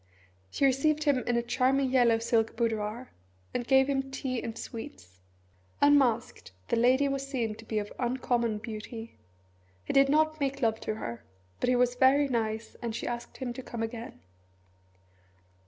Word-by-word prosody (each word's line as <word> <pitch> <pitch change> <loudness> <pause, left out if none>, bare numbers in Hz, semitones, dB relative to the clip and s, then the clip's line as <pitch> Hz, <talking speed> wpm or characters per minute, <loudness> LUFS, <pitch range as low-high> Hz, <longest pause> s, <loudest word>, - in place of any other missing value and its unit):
She 275 - +1
received 300 +3 +2
him 285 -4 +3
in 240 -1 +2
a 235 - +1
charming 260 +2 +1
yellow 240 -3 +4
silk 225 -1 +1
boudoir 225 +1 -2 0.4
and 240 -1 -3
gave 265 0 +5
him 270 -1 -1
tea 260 -2 -3
and 230 -1 -6
sweets. 225 - -9 0.6
Unmasked, 265 - +2 0.2
the - - +2
lady 255 +4 +4
was 275 0 -2
seen 240 -6 -2
to 225 +1 -13
be 220 - -3
of 205 -1 -3
uncommon 240 -2 0
beauty. 225 +1 -8 0.7
He - - -2
did 275 0 +5
not 310 +1 +2
make 275 -1 -2
love 220 -1 +2
to 215 - -3
her 120 - -6 0.4
but - - +1
he 250 - +4
was 245 0 +3
very 270 +3 +4
nice, 220 -3 -2
and 230 -2 -3
she - - -4
asked 240 -1 -5
him 250 -2 -4
to 260 - -7
come 235 -2 -5
again. 225 - -6
245 Hz, 170 wpm, -29 LUFS, 225-270 Hz, 0.7 s, gave